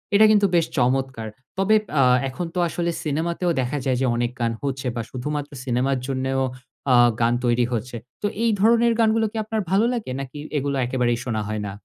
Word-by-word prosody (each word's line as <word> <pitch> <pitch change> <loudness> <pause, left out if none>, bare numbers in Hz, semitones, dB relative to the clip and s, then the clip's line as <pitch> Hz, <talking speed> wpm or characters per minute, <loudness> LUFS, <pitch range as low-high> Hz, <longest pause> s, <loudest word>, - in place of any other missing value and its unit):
এটা 215 +1 +7
কিন্তু 205 -1 +4
বেশ 165 - +4
চমৎকার। 130 -2 0 0.3
তবে 200 +3 +3 0.3
আ - - +6 0.3
এখন 170 +7 -4
তো - - 0
আসলে 170 +1 -2
সিনেমাতেও 170 +4 -1
দেখা 130 +4 -2
যায় 130 -2 +1
যে, - - +2
অনেক 120 0 0
গান 115 -1 +1
হচ্ছে 135 -2 -2
বা 115 - -1
শুধুমাত্র 145 +3 -4
সিনেমার 130 +2 +1
জন্যেও 135 0 -1 0.5
আ - - +7 0.3
গান 115 +1 +3
তৈরি 120 0 +3
হচ্ছে। 120 +2 -3 0.3
তো 205 - +1 0.2
এই 230 - +3
ধরনের 230 +2 +4
গানগুলো 220 0 +3
কি 225 - -6
আপনার 220 0 -2
ভালো 205 +4 +4
লাগে? 225 - -4
নাকি 135 +1 -7 0.2
এগুলা 140 0 -1
একেবারেই 120 -2 0
শোনা 110 -3 -1
হয় 110 -1 -3
না? - - -5
135 Hz, 195 wpm, -23 LUFS, 125-190 Hz, 0.5 s, এটা